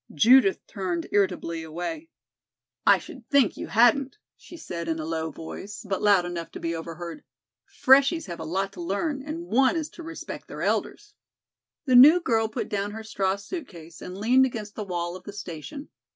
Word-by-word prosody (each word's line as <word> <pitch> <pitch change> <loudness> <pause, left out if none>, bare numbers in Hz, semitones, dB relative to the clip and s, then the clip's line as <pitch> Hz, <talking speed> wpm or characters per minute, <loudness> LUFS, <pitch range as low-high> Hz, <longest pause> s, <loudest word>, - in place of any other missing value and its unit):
Judith 230 - +5
turned 180 -5 -3
irritably 180 -4 0
away. 175 - -6 0.8
"I - - +8
should - - -12
think 275 -7 +3
you - - -6
hadn't," 245 - +3 0.2
she 345 - -13
said 170 - -6
in 160 -1 -1
a 155 - -4
low 160 0 -2
voice, 195 +8 -8
but 195 -1 -2
loud 200 -4 +4
enough 175 -1 -5
to - - -7
be 165 0 -2
overheard. 170 - -7 0.4
"Freshies 280 +5 +4
have 175 -3 -7
a - - -5
lot 195 +4 -2
to - - -8
learn 270 - -2
and 310 +4 -6
one 265 0 +3
is 315 -2 -2
to - - -12
respect 330 0 -8
their - - -6
elders." 415 0 -2 0.7
The 255 -3 +3
new 295 +8 +9
girl 225 -9 +1
put 220 - -4
down 200 0 -2
her 225 +1 -7
straw 195 -3 -1
suit 275 - -7
case 170 -2 -13
and 180 +1 -7
leaned 255 +6 +4
against 215 -4 -7
the 215 - -5
wall 175 -2 -3
of 185 - -10
the 205 - -9
station. 205 - -8
205 Hz, 190 wpm, -26 LUFS, 175-265 Hz, 0.8 s, new